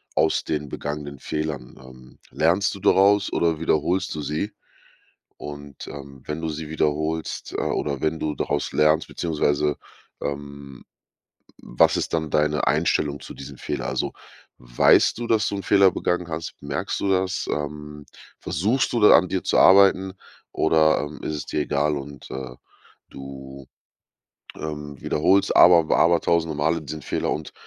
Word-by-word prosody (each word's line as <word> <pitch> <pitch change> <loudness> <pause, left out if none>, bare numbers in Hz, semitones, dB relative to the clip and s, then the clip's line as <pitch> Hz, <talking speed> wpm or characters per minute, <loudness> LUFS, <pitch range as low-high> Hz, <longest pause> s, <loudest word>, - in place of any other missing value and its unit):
aus - - +2
den 75 -2 -3
begangenen 75 -1 -6
Fehlern? 75 -4 -4
Ähm, 65 -1 -16
lernst 90 +5 +1
du - - -9
daraus 100 +2 +4
oder 80 -2 +1
wiederholst 80 +3 0
du 75 - -4
sie? 75 +9 -3 0.9
Und, 75 -2 -9
ähm, 70 -2 -10
wenn 75 +1 -4
du 80 - -2
sie 80 0 -6
wiederholst, 80 +1 -2
äh, - - -1
oder 70 -3 -2
wenn 80 +1 0
du 75 -1 -2
daraus 70 +1 -2
lernst 75 +1 +2
beziehungsweise, 75 -3 0 0.5
ähm, 70 -2 -7 0.7
was - - +2
ist - - -3
dann 80 -2 -1
deine 75 0 +1
Einstellung 70 -1 +1
zu - - -10
diesem 70 -1 -10
Fehler? - - -4
Also, - - -2 0.5
weißt - - +3
du, 120 - -4
dass 110 -3 +2
du 100 - -3
'n 100 - -5
Fehler 100 0 +5
begangen 90 -1 -2
hast? 80 +1 -5
Merkst 70 0 -3
du 100 - 0
das? 95 0 0
Ähm, 75 0 -5 0.3
versuchst 110 - 0
du 120 - +1
da 105 - +8
an 90 +2 -1
dir 95 - -2
zu - - +1
arbeiten, 95 0 +5 0.4
oder, 80 -1 +3
ähm, 75 +1 -7
ist 75 - -3
es 75 - -5
dir - - -2
egal 75 +1 0
und, 70 0 -10
äh, 65 -1 -6 0.6
du, 70 0 -10 0.9
ähm, 75 -3 -7
wiederholst, 95 +6 +2
aber 85 -3 +7
w - - +2
aber 85 0 +4
tausende 80 -2 0
Male 80 +2 0
diesen 75 +1 -7
Fehler - - -2
und - - -6
75 Hz, 160 wpm, -23 LUFS, 70-85 Hz, 0.9 s, da